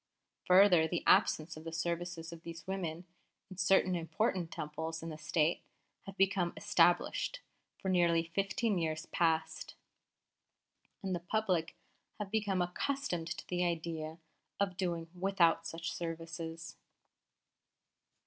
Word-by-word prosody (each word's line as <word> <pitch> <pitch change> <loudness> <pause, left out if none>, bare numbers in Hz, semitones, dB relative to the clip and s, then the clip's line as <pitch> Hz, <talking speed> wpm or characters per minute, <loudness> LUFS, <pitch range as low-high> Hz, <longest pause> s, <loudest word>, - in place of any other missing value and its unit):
Further, 180 -3 +7
the 175 +1 -2
absence 155 +1 +4
of 155 - -10
the 165 - -6
services 170 +1 -3
of 165 - -10
these 165 0 -9
women 180 -3 -4 0.5
in 185 - -9
certain 185 0 +4
important 175 +1 -1
Temples 160 +2 -5
in 165 - -4
the 155 - -6
State 160 +1 +1 0.5
has 195 - -7
become 195 -3 +2
established - - +2 0.4
for - - -6
nearly 170 -3 +3
fifteen 200 +1 +1
years 160 0 -2
past, 160 -2 0 1.3
and 190 -1 -1
the 175 - -1
public 180 -3 0 0.4
have 205 -2 -5
become 205 -4 +1
accustomed 180 -2 -2
to 165 - -5
the 180 0 0
idea 160 -2 -2 0.4
of 200 -2 0
doing 170 -3 -2
without 175 -3 +2
such 165 0 -4
services.' 165 -1 -6
170 Hz, 125 wpm, -33 LUFS, 165-190 Hz, 1.3 s, Further